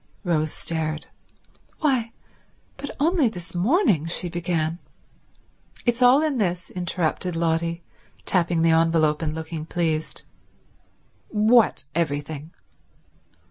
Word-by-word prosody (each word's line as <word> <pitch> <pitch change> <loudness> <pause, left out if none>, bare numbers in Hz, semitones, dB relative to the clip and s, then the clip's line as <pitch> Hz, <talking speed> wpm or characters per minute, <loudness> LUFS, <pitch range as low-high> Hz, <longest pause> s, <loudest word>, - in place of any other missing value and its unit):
Rose 155 -4 +1
stared. 155 -2 -3 0.8
"Why, 255 -7 +1 0.6
but 285 0 -7
only 310 -3 +3
this 175 -5 -9
morning—" 190 - +2
she 175 +1 +1
began. 170 -1 -2 1.1
"It's 240 0 +1
all 255 +4 +6
in 295 -5 0
this," 180 -3 -1
interrupted 175 0 -1
Lotty, 165 0 0 0.4
tapping 170 -2 +1
the 165 - +5
envelope 160 -2 +3
and 155 -1 -2
looking 160 -1 -5
pleased. 160 -3 -2 1.0
"What—everything?" 160 - +1
170 Hz, 100 wpm, -24 LUFS, 160-215 Hz, 1.1 s, all